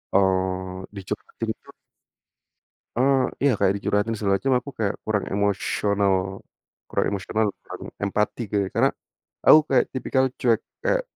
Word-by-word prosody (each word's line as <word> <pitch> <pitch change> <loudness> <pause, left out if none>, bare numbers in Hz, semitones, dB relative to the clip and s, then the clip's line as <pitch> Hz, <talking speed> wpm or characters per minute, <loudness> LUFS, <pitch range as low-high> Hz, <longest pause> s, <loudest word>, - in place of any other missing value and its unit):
eee, 95 -1 +1 0.2
dicurhatin 95 -2 -5
itu - - -11 1.3
eee, 135 +1 +4 0.2
iya 140 - +5
kayak 95 - +3
dicurhatin 105 +2 0
segala 100 -2 +2
macem 135 -1 +2
aku 125 - -6
kayak 105 -2 0
kurang 105 -2 0
emosional 100 0 +1 0.8
kurang - - +1
emosional, 105 +3 0 0.2
kurang - - -9 0.2
empati, 105 +3 0
kayak 100 -2 0
karena - - +4 0.5
aku 155 - +9
kayak 130 -2 +4
tipikal 130 0 +1
cuek 115 -3 +2 0.2
kayak - - +3
105 Hz, 130 wpm, -24 LUFS, 100-125 Hz, 1.3 s, aku